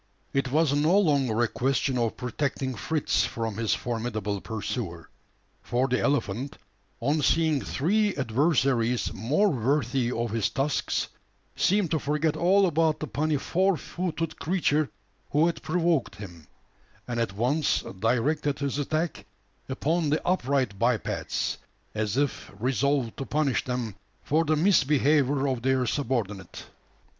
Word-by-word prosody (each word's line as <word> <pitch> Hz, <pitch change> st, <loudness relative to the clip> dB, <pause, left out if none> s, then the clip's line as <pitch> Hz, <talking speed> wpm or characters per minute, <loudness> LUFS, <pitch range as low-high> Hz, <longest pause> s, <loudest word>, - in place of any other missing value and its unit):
It 135 Hz, -2 st, 0 dB
was 155 Hz, -1 st, +3 dB
no 155 Hz, +6 st, +3 dB
longer 140 Hz, -, +2 dB
a -, -, +3 dB
question 135 Hz, +2 st, 0 dB
of 115 Hz, -2 st, -1 dB
protecting 130 Hz, +1 st, -2 dB
Fritz 150 Hz, +6 st, 0 dB
from 115 Hz, -3 st, -3 dB
his 115 Hz, -1 st, +1 dB
formidable 110 Hz, -4 st, -3 dB
pursuer; 105 Hz, -6 st, -4 dB, 0.5 s
for 125 Hz, +2 st, 0 dB
the 125 Hz, -1 st, +1 dB
elephant, 140 Hz, -2 st, -1 dB, 0.4 s
on 145 Hz, +6 st, +1 dB
seeing 160 Hz, -1 st, +2 dB
three 205 Hz, +8 st, +1 dB
adversaries 125 Hz, -2 st, +1 dB
more 145 Hz, -, +2 dB
worthy 130 Hz, -, 0 dB
of 115 Hz, -2 st, -2 dB
his 110 Hz, -2 st, +1 dB
tusks, 140 Hz, +2 st, -1 dB, 0.5 s
seemed 195 Hz, -3 st, +2 dB
to 160 Hz, -, +2 dB
forget 150 Hz, +2 st, 0 dB
all 190 Hz, +5 st, +4 dB
about 160 Hz, -2 st, +2 dB
the 155 Hz, -, -3 dB
puny 150 Hz, +5 st, 0 dB
four 185 Hz, +6 st, +1 dB
footed 165 Hz, -2 st, -4 dB
creature 155 Hz, -4 st, +1 dB, 0.4 s
who 150 Hz, +3 st, +3 dB
had 170 Hz, -, -1 dB
provoked 165 Hz, -, 0 dB
him; 90 Hz, -7 st, -10 dB, 0.6 s
and 120 Hz, -1 st, -2 dB
at 115 Hz, -5 st, -1 dB
once 135 Hz, +8 st, +1 dB, 0.2 s
directed 140 Hz, +6 st, +1 dB
his 140 Hz, 0 st, -2 dB
attack 155 Hz, +3 st, -2 dB, 0.4 s
upon 155 Hz, +4 st, 0 dB
the 150 Hz, -, 0 dB
upright 135 Hz, -, +1 dB
bipeds 115 Hz, -1 st, -1 dB, 0.3 s
as 110 Hz, +1 st, -1 dB
if 145 Hz, -1 st, -1 dB
resolved 130 Hz, 0 st, 0 dB
to -, -, -3 dB
punish 145 Hz, -3 st, +1 dB
them 125 Hz, -4 st, -3 dB, 0.3 s
for 160 Hz, +3 st, +2 dB
the 155 Hz, 0 st, +2 dB
misbehaviour 145 Hz, -4 st, +3 dB
of 130 Hz, -3 st, -1 dB
their 130 Hz, 0 st, +2 dB
subordinate. 115 Hz, -, -3 dB
135 Hz, 135 wpm, -27 LUFS, 120-155 Hz, 0.6 s, all